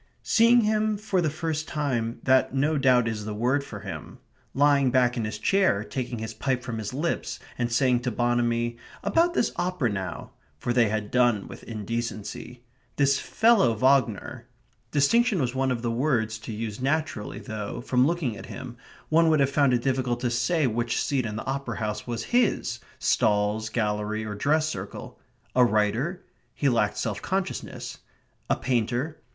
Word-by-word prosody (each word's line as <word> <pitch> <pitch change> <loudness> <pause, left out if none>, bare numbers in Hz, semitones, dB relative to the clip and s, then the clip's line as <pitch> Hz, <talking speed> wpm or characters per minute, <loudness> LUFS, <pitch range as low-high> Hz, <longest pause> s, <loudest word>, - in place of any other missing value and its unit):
Seeing 235 +1 +5
him 215 0 +1
for 200 -3 0
the 160 - +1
first 155 0 -3
time 120 -6 -2
that 130 0 +3
no 145 +4 +2
doubt 125 -3 +4
is 110 -2 -3
the 105 0 -5
word 125 +6 +1
for - - -8
him. - - -8 0.4
Lying 140 -1 +4
back 125 -1 +3
in 115 -3 -2
his 105 0 -4
chair, 190 - +2
taking 125 +1 -4
his 110 0 -5
pipe 125 +3 -1
from 115 -3 -4
his 105 -1 -4
lips, 150 +6 -2 0.2
and 120 -1 -2
saying 125 +1 +3
to 125 +1 -2
Bonamy: 120 0 0 0.3
"About 345 +1 +2
this - - +2
opera 175 - 0
now" 95 -4 -5 0.3
(for 120 +10 -2
they 120 -3 +4
had 110 -1 -3
done 120 -5 +2
with - - -10
indecency). 115 +2 -5 0.3
"This 140 -1 +3
fellow 220 - +3
Wagner"... 130 -3 +1 0.4
distinction 210 - +3
was 125 -4 0
one 130 0 0
of 125 -2 -2
the 120 - 0
words 115 -4 0
to 110 - -7
use 110 +1 -5
naturally, 140 -8 -1
though, 105 0 -5
from 125 +1 +2
looking 160 -9 -1
at - - -9
him, 125 -2 -8 0.3
one 165 +1 +4
would 155 -2 +3
have 135 0 +2
found 140 -2 +3
it 120 -1 +1
difficult 130 -2 0
to 125 - 0
say 155 +6 +1
which 120 0 0
seat 130 -5 0
in 105 - -5
the 110 - -5
opera 135 -4 -3
house 105 0 -3
was 120 -1 -3
his, 245 -3 +2 0.2
stalls, 105 +1 +1
gallery, 105 -1 -1
or 105 - -4
dress 150 +8 +1
circle. 155 - -7 0.4
A 125 - +6
writer? 120 - +1 0.3
He 140 - +2
lacked 110 -4 +1
self 105 -2 -2
consciousness. 190 0 -4 0.5
A - - +3
painter? 125 +5 -1
125 Hz, 175 wpm, -26 LUFS, 110-145 Hz, 0.5 s, A